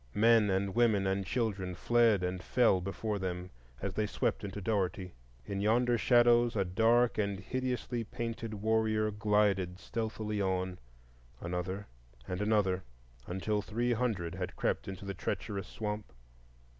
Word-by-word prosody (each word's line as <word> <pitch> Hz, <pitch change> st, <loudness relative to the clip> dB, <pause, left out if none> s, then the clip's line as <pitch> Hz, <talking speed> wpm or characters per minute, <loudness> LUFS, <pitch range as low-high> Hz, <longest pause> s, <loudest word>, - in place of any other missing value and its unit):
Men 115 Hz, -1 st, +5 dB
and 95 Hz, 0 st, 0 dB
women 110 Hz, -5 st, +3 dB
and 95 Hz, +1 st, 0 dB
children 100 Hz, -7 st, -1 dB
fled 115 Hz, 0 st, +3 dB
and 90 Hz, 0 st, -2 dB
fell 110 Hz, -2 st, +3 dB
before 100 Hz, +3 st, -3 dB
them 90 Hz, -1 st, -4 dB, 0.3 s
as 100 Hz, -, -2 dB
they 105 Hz, +2 st, 0 dB
swept -, -, -1 dB
into 100 Hz, 0 st, -5 dB
Dougherty. 95 Hz, -3 st, -1 dB, 0.3 s
In 100 Hz, +6 st, -3 dB
yonder 120 Hz, +3 st, +3 dB
shadows 120 Hz, 0 st, +4 dB
a 100 Hz, -2 st, +1 dB
dark 115 Hz, +6 st, +3 dB
and 100 Hz, -2 st, 0 dB
hideously 125 Hz, +1 st, -2 dB
painted 115 Hz, 0 st, -5 dB
warrior 110 Hz, 0 st, +1 dB
glided 105 Hz, -3 st, +1 dB
stealthily 110 Hz, -1 st, -3 dB
on,—another 90 Hz, +1 st, -4 dB, 0.4 s
and 90 Hz, +1 st, -3 dB
another, 100 Hz, -3 st, +2 dB, 0.4 s
until 105 Hz, +3 st, -1 dB
three 120 Hz, +4 st, 0 dB
hundred 105 Hz, -8 st, -1 dB
had 90 Hz, 0 st, -4 dB
crept -, -, -1 dB
into 95 Hz, +1 st, -6 dB
the 100 Hz, -, -3 dB
treacherous 95 Hz, +1 st, -3 dB
swamp. 105 Hz, 0 st, -4 dB
105 Hz, 135 wpm, -32 LUFS, 95-110 Hz, 0.4 s, Men